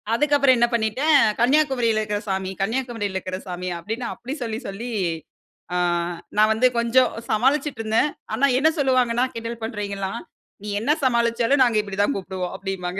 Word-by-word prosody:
அதுக்கப்புறம் 280 0 +4
என்ன 240 0 +4
பண்ணிட்டேன், 235 +7 +3 0.2
கன்னியாகுமரில 245 -3 +2
இருக்கிற 210 -1 -2
சாமி, 190 -1 -2
கன்னியாகுமரில 225 -2 -2
இருக்கிற 185 0 -3
சாமி 180 0 -5
அப்டின்னு 225 +7 -4
அப்டி 245 +3 -7
சொல்லி 225 -1 -3
சொல்லி 220 +5 -6 0.8
அ. - - +1 0.6
நான் 215 +1 +5
வந்து 235 +4 +4
கொஞ்சம் 235 +2 +3 0.2
சமாளிச்சிட்டு 270 +4 +1
இருந்தேன். 225 +6 +1 0.2
ஆனா 280 - +3
என்ன 310 +3 +4
சொல்லுவாங்கன்னா, 255 -3 +2
கிண்டல் 230 0 -6
பண்றவிங்கலாம், 200 -4 -4 0.4
நீ 210 - -5
என்ன 230 +7 +1
சமாளிச்சாலும் 235 +1 +2
நாங்க 235 -4 +2
இப்டித்தான் 205 +4 -1
கூப்பிடுவோம் 185 -2 -4
அப்டின்னுபாங்க. 190 -1 -4
230 Hz, 145 wpm, -23 LUFS, 205-255 Hz, 0.8 s, நான்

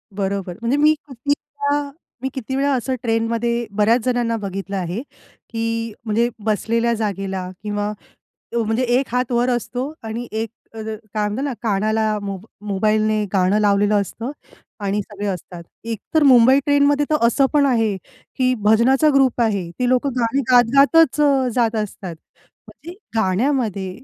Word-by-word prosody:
बरोबर. 195 -2 -3
म्हणजे 235 +4 +1
मी 305 +1 +5
किती 265 -1 -10
वेळा 285 0 -3 0.3
मी 265 - -2
किती 265 0 -4
वेळा 280 +1 +1
असं 260 +1 -1
ट्रेनमध्ये 230 +1 0
बऱ्याच 220 +4 +3
जणांना 240 -2 +1
बघितलं 195 -1 -5
आहे, 180 +4 -3 0.5
की 230 -1 -2
म्हणजे 230 +2 +1 0.2
बसलेल्या 230 +2 +1
जागेला 195 -4 -3
किंवा 205 0 -2 0.6
अ, - - +2
म्हणजे 225 +2 0
एक 270 - 0
हात 250 0 -1
वर 240 +1 +2
असतो 250 +3 -2
आणि 230 +2 -5
एक 220 +1 -2 0.2
अ, - - -11
काय 215 -1 -4
म्हणतात 215 +7 -3
ना, 280 -3 -2
कानाला 215 0 +1
मो 195 -1 -4 0.3
मोबाईलने 215 +2 +1
गाणं 190 +2 +3
लावलेलं 205 0 +3
असतं 230 +6 -5 0.5
आणि 200 0 -1
सगळे 205 0 -6
असतात. 180 -2 -5 0.2
एक 225 -2 -4
तर 315 -1 +4
मुंबई 260 0 +6
ट्रेनमध्ये 285 0 +3
तर 305 - +3
असं 270 +4 +3
पण 290 -1 +4
आहे, 225 -6 +2 0.4
की 255 -1 +2
भजनाचा 245 +8 +4
ग्रुप 265 -3 +3
आहे. 200 -6 0
ती 250 - +1
लोकं 255 +2 +2
गाणी 240 +3 +1
गात 245 -1 +7
गातच 295 +1 +5
अ, 275 -3 +3
जात 230 -2 +2
असतात. 190 -4 -8 0.5
म्हणजे 340 +3 -11 0.2
गाण्यामध्ये 215 -1 0
230 Hz, 155 wpm, -20 LUFS, 210-260 Hz, 0.6 s, गात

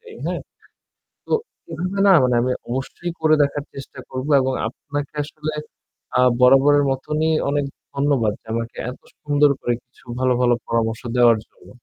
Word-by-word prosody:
যাই, 455 -1 -13
হ্যাঁ? - - -2 0.9
তো - - -5 0.4
এভাবে 180 +4 -3
না, - - +8
মানে 125 -1 +2
আমি 130 - 0 0.2
অবশ্যই 135 +7 -4
করে 155 0 +4
দেখার 145 0 -1
চেষ্টা 135 0 -10
করব 130 +2 -4
এবং 130 0 0 0.2
আপনাকে 145 +4 -6
আসলে 155 +1 -5 0.6
আ - - +5 0.2
বরাবরের 135 +3 +6
মতনই 150 +4 -1 0.2
অনেক 145 0 0 0.3
ধন্যবাদ 140 -6 +1
যে, - - -34
আমাকে 115 0 -4
এত 125 - -11 0.2
সুন্দর 145 0 +3
করে 120 - 0
কিছু 125 - -26 0.2
ভালো, 130 -1 +3
ভালো 120 -1 +4
পরামর্শ 115 -1 -1
দেওয়ার 120 -2 +5
জন্য। - - -21
140 Hz, 155 wpm, -21 LUFS, 125-150 Hz, 0.9 s, না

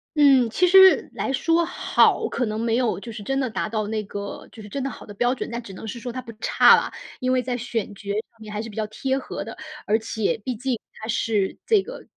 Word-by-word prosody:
嗯， 270 -5 +5
其 360 +10 +2
实 380 +1 +7
来 270 - -2
说 330 +5 +2
好， 355 - +2
可 245 - -1
能 215 +1 -3
没 230 0 +1
有 245 -5 0
就 230 +2 -8
是 215 -1 -8
真 270 +6 -1
的 260 -3 0
达 220 - -2
到 215 -1 -2
那 215 -1 -2
个 200 0 -7
就 220 - -11
是 205 - -10
真 275 +6 -4
的 275 - -2
好 - - -10
的 205 - -10
标 245 +5 +1
准， - - -5
但 235 +1 -3
只 195 -4 -11
能 220 - -8
是 235 +3 -6
说 245 0 -5
它 255 +1 -5
不 235 -2 -10
差 - - +6
啦。 - - -1 0.3
因 255 -1 0
为 255 -1 +2
在 250 -1 -2
选 225 -3 -3
角 200 0 -10 0.2
上 230 - -32
面 215 -1 -9
还 210 - -4
是 230 - -7
比 205 - -12
较 215 -1 -2
贴 265 +5 -2
合 - - -6
的， - - -8 0.3
而 215 +2 +2
且 220 -1 -2
毕 255 -2 -2
竟 250 0 -2
它 220 - -9
是 215 -3 0
这 425 -4 +4
个 - - -9
235 Hz, 280 characters per minute, -24 LUFS, 215-265 Hz, 0.3 s, 实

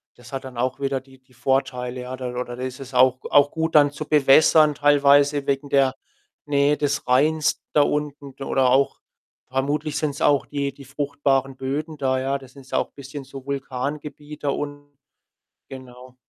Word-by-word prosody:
Das 120 +2 -15
hat 135 - -4
dann 130 -2 -10
auch 130 +1 -1
wieder 135 -1 -1
die 135 0 -20
die 130 0 -28
Vorteile, 130 -1 -1
ja. 125 +1 -6
Da 125 -1 -5
oder 125 0 -5
ist 130 0 -5
es 135 -1 -10
auch 130 0 +4
auch 145 0 +5
gut 160 0 -2
dann 145 -1 +6
zu 155 +1 -6
bewässern 150 +1 +5
teilweise 145 0 +4
wegen 140 +1 -1
der 135 -2 +3 0.5
Nähe 145 0 +2
des 145 -2 -1
Rheins 150 +5 +2
da 150 - +5
unten 145 -2 -2
d 135 - -8
oder 130 -1 +2
auch 135 +2 +2 0.5
vermutlich 145 +3 -2
sind's 150 -2 -2
auch 145 -2 +3
die 140 -1 -3
die 140 - -14
fruchtbaren 135 -1 -1
Böden 150 +4 -4
da, 130 -2 0
ja. 135 +1 -1
Das 130 -2 -15
sind's 135 -2 -15
auch - - 0
bisschen 140 +1 -8
so 135 0 -10
Vulkangebiet 145 +2 -5
da 145 - +1
unten. 145 0 -5 0.7
Genau. 130 -1 -12
140 Hz, 175 wpm, -23 LUFS, 130-145 Hz, 0.7 s, dann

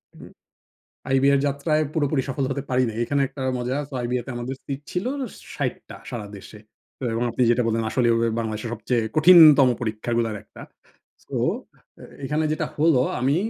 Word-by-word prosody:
হুম। - - -13 0.8
আইবিএর 135 +1 +4
যাত্রায় 150 +2 0
পুরোপুরি 145 -2 +1
সফল 135 +1 -2
হতে 140 +1 -2
পারি 130 0 +2
নাই। 110 - -7
এইখানে 140 +4 0
একটা 135 - -10 0.2
মজা। 125 +2 -2
সো - - -13
আইবিএ 125 +1 -1
তে 130 - -6
আমাদের 125 +3 -4
সিট 140 0 -5
ছিল 180 +4 -2 0.5
৬০ - - -1
টা - - -9
সারা 115 -3 -5
দেশে। 100 +2 -12 0.6
এবং 115 +2 -1
আপনি 125 - -3
যেটা 120 +1 +2
বললেন 115 0 0
আসলে 125 +1 +1
ও - - +2
হবে 115 0 +1
বাংলাদেশের 110 0 -4
সবচেয়ে 115 +1 -1
কঠিনতম 155 -4 +8
পরীক্ষাগুলার 115 0 -2
একটা। - - -15 0.6
সো - - -7 0.7
এ - - -11 0.2
এখানে 150 +3 0
যেটা 155 0 -1
হলো 150 -4 +4 0.2
আমি 135 +3 +2
130 Hz, 175 wpm, -23 LUFS, 115-145 Hz, 0.8 s, কঠিনতম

